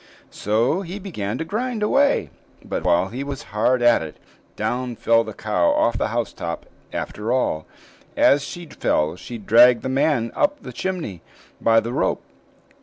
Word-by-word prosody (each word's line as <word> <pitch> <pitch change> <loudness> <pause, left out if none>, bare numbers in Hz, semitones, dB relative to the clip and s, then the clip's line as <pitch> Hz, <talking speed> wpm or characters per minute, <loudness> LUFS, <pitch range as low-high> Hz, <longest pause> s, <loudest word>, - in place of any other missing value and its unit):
So 115 - +1
he 185 +1 -6
began 125 - -4
to 160 - -3
grind 225 +4 -2
away; 280 +6 +2 0.3
but - - -3
while 90 +2 +2
he 125 +6 -5
was 140 -2 -6
hard 120 +4 +2
at 120 -1 +5
it, 80 -1 -7 0.4
down 120 +3 -2
fell 115 +1 +3
the 110 - -7
cow 100 -5 0
off 115 - +2
the - - +1
housetop 110 -7 -4 0.3
after 110 +3 -4
all, 125 -11 0 0.5
and - - +4
as 140 0 +5
she 175 +3 -7
fell 75 - 0
she 120 +6 -8
dragged 115 +3 +5
the 130 - -2
man 130 -3 +1
up 295 0 0
the - - -8
chimney, 170 - -4 0.4
by 115 0 +5
the 120 +2 -5
rope. - - 0
120 Hz, 170 wpm, -22 LUFS, 110-160 Hz, 0.5 s, at